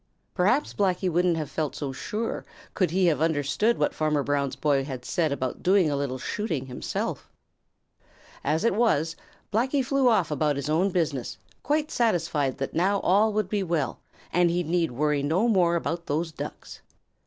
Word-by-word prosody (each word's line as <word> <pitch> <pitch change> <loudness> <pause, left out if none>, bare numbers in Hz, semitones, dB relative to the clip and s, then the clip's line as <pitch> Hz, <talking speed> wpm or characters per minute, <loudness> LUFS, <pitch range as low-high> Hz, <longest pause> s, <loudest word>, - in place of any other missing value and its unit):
Perhaps 210 +11 +2
Blacky 190 -2 +1
wouldn't 175 0 +2
have 155 -2 -4
felt 155 -3 -2
so 140 -2 -3
sure 215 - -4 0.3
could 185 -3 +1
he 185 +3 +2
have 155 -4 +2
understood 160 +8 +1
what - - +1
Farmer 150 -2 0
Brown's 140 -1 -1
boy 140 -3 +1
had 130 -3 -6
said 160 -4 0
about 130 -2 -3
doing 185 -4 +3
a - - 0
little 140 -2 -2
shooting 160 - -3
himself. 125 -1 -4 1.1
As 155 +6 0
it 230 - +3
was, 165 -8 +2 0.4
Blacky 260 +4 +1
flew 275 -1 +3
off 190 -9 +2
about 150 0 +1
his 140 +1 -3
own 175 +5 +2
business, 160 -9 -2 0.2
quite 300 +1 0
satisfied 165 - +1
that 135 - -4
now 195 +4 +2
all 210 +4 +3
would 210 -2 0
be 205 +1 -1
well, 165 -8 -1 0.3
and 175 0 +4
he 175 +1 0
need 165 +1 +1
worry 150 +3 0
no 165 +11 +1
more 180 -6 +3
about 170 0 -3
those 160 +3 -1
Ducks. - - -8
165 Hz, 175 wpm, -26 LUFS, 145-200 Hz, 1.1 s, and